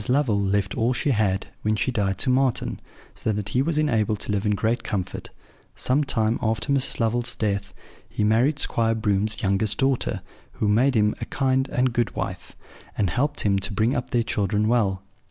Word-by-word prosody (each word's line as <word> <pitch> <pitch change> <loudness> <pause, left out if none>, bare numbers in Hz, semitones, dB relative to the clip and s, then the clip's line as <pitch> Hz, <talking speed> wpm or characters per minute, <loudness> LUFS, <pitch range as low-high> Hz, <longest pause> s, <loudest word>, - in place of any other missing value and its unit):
Lovel 125 -6 +2
left 100 0 0
all 120 +3 +1
she 140 - 0
had, 100 -5 +1 0.2
when 110 0 +1
she 110 +5 0
died, 100 -5 0
to 130 - +1
Marten; 130 -1 0 0.3
so 110 - -2
that 105 -1 -3
he 125 +5 +1
was 155 +2 0
enabled 110 -8 +1
to - - -3
live 105 +1 0
in 105 - +2
great 115 +4 0
comfort. 95 -4 -4 0.5
Some 140 +4 +1
time 115 -4 +1
after 115 +5 0
Mrs. 135 -1 +1
Lovel's 120 +1 0
death, 100 -2 -2 0.3
he - - -2
married 120 +8 +3
Squire 115 -5 +1
Broom's 110 0 0
youngest 100 +2 +1
daughter, 125 -7 0 0.3
who 105 - -1
made 125 +6 +3
him 105 -1 +3
a - - -2
kind 130 0 0
and 125 -1 +1
good 120 -1 0
wife, - - -5 0.4
and 100 -5 +1
helped 145 - 0
him 100 -2 +2
to 100 +3 -3
bring 110 +6 +1
up 125 - -3
their 120 -1 +1
children 105 0 0
well. 100 -5 +1
110 Hz, 190 wpm, -24 LUFS, 105-125 Hz, 0.5 s, married